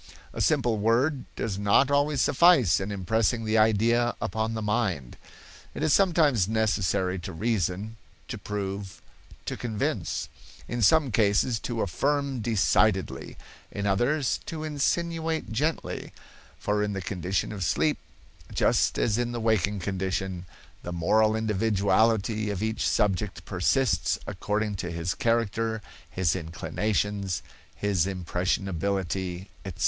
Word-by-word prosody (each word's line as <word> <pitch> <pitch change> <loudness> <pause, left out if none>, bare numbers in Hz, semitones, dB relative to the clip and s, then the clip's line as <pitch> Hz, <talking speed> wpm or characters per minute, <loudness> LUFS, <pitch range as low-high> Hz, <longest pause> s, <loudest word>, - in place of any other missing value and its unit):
A - - -3
simple 115 -3 +2
word 125 +6 +1
does 100 -3 -3
not 105 +7 +3
always 145 -1 +2
suffice 145 - +5
in 95 +1 -4
impressing 110 +4 0
the 110 +1 +2
idea 115 +3 +3
upon 110 0 -2
the 110 - -3
mind. 105 - -1 0.6
It - - -3
is 155 - +3
sometimes 155 - +3
necessary 100 -4 +1
to 95 +2 -6
reason, 105 +2 -2 0.3
to - - -6
prove, 100 -1 -5 0.5
to - - -3
convince; 110 -4 -2 0.4
in 120 0 -3
some 140 +5 +4
cases 110 +2 +2
to 115 -1 -3
affirm 140 +6 -1
decidedly, 110 -4 +1 0.3
in 100 0 -4
others 120 +8 +1
to 155 -1 -5
insinuate 160 0 -1
gently; 150 +9 -2 0.4
for 105 0 0
in 105 0 -1
the 95 - -3
condition 95 0 -2
of 100 -3 -4
sleep, 150 - +1 0.5
just - - +2
as 110 0 +1
in 120 0 -1
the 120 - -3
waking 105 -3 +1
condition, 95 -1 -3 0.3
the 90 - -6
moral 110 +6 +2
individuality 110 0 +1
of 100 0 -2
each 110 0 -1
subject 100 -1 0
persists 90 -2 +1
according 105 +1 -2
to 90 - -4
his 85 +2 -2
character, 115 0 0 0.3
his 90 -3 0
inclinations, 100 +2 -2 0.3
his 95 -4 +1
impressionability, 95 0 -2 0.2
etc. 95 -4 -8
105 Hz, 125 wpm, -27 LUFS, 95-120 Hz, 0.6 s, suffice